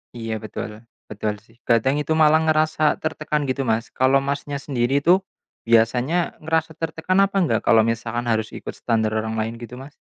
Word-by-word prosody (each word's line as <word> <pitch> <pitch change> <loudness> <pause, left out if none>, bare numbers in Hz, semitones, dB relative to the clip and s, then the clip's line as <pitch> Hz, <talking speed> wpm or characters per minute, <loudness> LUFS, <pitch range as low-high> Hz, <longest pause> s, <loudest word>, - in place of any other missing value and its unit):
Iya, 115 -1 -4
betul, 110 -1 -6 0.4
betul 105 0 -2
sih. 115 - -25
Kadang 130 +5 +2
itu 155 +2 -1
malah 155 0 +5
ngerasa 155 -1 +2
tertekan, 155 -1 -2
gitu, 130 -1 -2
Mas. 110 +1 -1
Kalau 135 +1 +2
Masnya 145 +1 -3
sendiri 135 +1 0
itu, 180 +2 +5 0.5
biasanya 125 +9 +2
ngerasa 160 +1 -1
tertekan 165 +3 -1
apa 195 0 +2
enggak, - - +1
kalau 110 -1 +6
misalkan 115 +1 -2
harus 110 -2 +1
ikut - - -6
standar 110 -2 -1
orang 110 0 -3
lain, 110 +1 -2
gitu, 120 +1 -9
Mas? 135 +3 -11
130 Hz, 170 wpm, -22 LUFS, 115-155 Hz, 0.5 s, kalau